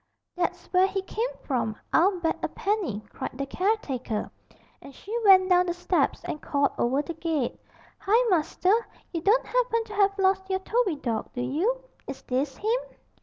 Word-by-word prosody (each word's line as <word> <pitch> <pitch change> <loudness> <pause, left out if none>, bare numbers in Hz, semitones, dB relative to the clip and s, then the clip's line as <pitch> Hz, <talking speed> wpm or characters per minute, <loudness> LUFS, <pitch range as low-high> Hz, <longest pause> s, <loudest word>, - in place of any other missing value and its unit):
'That's 355 -1 -2
where 370 +1 +5
he 390 0 -3
come 460 +5 -2
from, 230 -5 -1 0.2
I'll 365 +2 +4
bet 325 -1 +1
a - - 0
penny,' 390 - -2
cried - - -6
the 275 - -2
caretaker, 275 - -1 0.5
and 275 - -12
she 425 +4 -7
went 380 -2 +7
down 360 -1 +4
the 345 - -1
steps 355 0 0
and 300 - -5
called 280 -1 +1
over 265 +5 +2
the 335 - -5
gate, 320 -5 -2 0.4
'Hi, 455 +4 +3
master, 355 +3 +2 0.4
you 335 - -2
don't 435 +8 +3
happen 485 -2 +1
to 435 -1 -11
have 400 -1 +2
lost 380 0 +2
your 380 - +1
Toby 400 -1 0
dawg, 235 -6 -3
do 245 - -3
you? 365 - 0 0.2
Is 275 - -7
this 265 +2 -2
him?' - - -2
365 Hz, 175 wpm, -26 LUFS, 280-410 Hz, 0.5 s, went